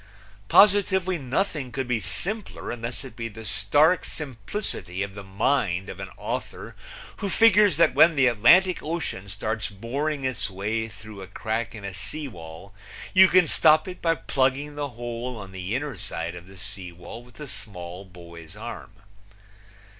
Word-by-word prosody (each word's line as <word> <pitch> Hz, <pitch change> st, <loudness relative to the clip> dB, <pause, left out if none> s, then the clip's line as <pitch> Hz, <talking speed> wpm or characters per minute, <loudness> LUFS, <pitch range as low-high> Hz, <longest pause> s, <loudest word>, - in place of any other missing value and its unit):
Positively 190 Hz, -3 st, +5 dB
nothing 140 Hz, 0 st, -2 dB
could 135 Hz, 0 st, -3 dB
be 125 Hz, -2 st, +1 dB
simpler 195 Hz, -, -2 dB
unless 120 Hz, +2 st, -5 dB
it 130 Hz, -, -10 dB
be 115 Hz, -1 st, -4 dB
the 110 Hz, 0 st, -10 dB
stark 145 Hz, -, +3 dB
simplicity 115 Hz, -, -5 dB
of 100 Hz, -1 st, -6 dB
the 100 Hz, -, -8 dB
mind 95 Hz, -1 st, 0 dB
of -, -, -8 dB
an -, -, -6 dB
author -, -, -5 dB, 0.4 s
who 200 Hz, -, -3 dB
figures 210 Hz, -2 st, +5 dB
that 170 Hz, -, +4 dB
when 155 Hz, +4 st, +6 dB
the 135 Hz, -2 st, +4 dB
Atlantic 150 Hz, -, +5 dB
Ocean 150 Hz, -, -4 dB
starts 110 Hz, +3 st, -3 dB
boring 135 Hz, +8 st, -3 dB
its 110 Hz, -5 st, -2 dB
way 105 Hz, +4 st, -2 dB
through 105 Hz, -1 st, -11 dB
a 95 Hz, -, -8 dB
crack 110 Hz, +3 st, -3 dB
in 105 Hz, -2 st, -8 dB
a 100 Hz, -, -5 dB
sea 150 Hz, -, -3 dB
wall 85 Hz, -2 st, -11 dB, 0.4 s
you 190 Hz, 0 st, +8 dB
can 180 Hz, -2 st, +5 dB
stop 155 Hz, +1 st, +5 dB
it 185 Hz, 0 st, -8 dB
by 165 Hz, -1 st, +2 dB
plugging 135 Hz, +1 st, 0 dB
the 145 Hz, -1 st, -3 dB
hole 120 Hz, 0 st, -5 dB
on 100 Hz, -2 st, -9 dB
the 95 Hz, +3 st, -4 dB
inner 140 Hz, -1 st, -3 dB
side 85 Hz, +1 st, -3 dB
of 90 Hz, 0 st, -10 dB
the 95 Hz, 0 st, -14 dB
sea 95 Hz, -1 st, -6 dB
wall 90 Hz, +7 st, -10 dB
with 125 Hz, +3 st, -18 dB
a 150 Hz, -, -7 dB
small 95 Hz, -6 st, -8 dB
boy's 85 Hz, -3 st, -13 dB
arm. -, -, -7 dB
120 Hz, 170 wpm, -25 LUFS, 100-150 Hz, 0.4 s, you